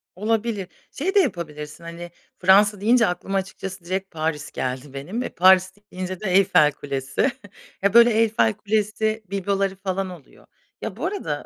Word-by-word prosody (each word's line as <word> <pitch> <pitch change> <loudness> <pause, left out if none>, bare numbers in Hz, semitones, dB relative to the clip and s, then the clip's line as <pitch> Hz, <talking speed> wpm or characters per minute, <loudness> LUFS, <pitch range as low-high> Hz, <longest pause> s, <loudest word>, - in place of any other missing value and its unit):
Olabilir. 215 -1 -1 0.2
Şey 375 +8 -2
de - - +7
yapabilirsin, 160 - -3
hani, 170 +1 -8 0.3
Fransa 200 +2 +4
deyince 235 +1 +4
aklıma 185 +2 -2
açıkçası 190 -1 -6
direkt 190 +2 -3
Paris 155 -2 -3
geldi 130 +2 -4
benim, 175 - -4
eee, - - -4
Paris 185 +1 +5 0.2
deyince 185 0 -5
de 195 -4 -3
Eyfel 185 -6 +5
Kulesi. 140 - -2 0.5
Ya, 200 +1 +2
böyle, 235 0 +7
Eyfel 220 0 +3
Kulesi 215 +1 -1
bibloları 195 0 -1
falan 190 0 -3
oluyor. 170 -7 -14 0.4
Ya, - - -5
bu - - -3
arada, 405 - -3
190 Hz, 150 wpm, -23 LUFS, 170-215 Hz, 0.5 s, de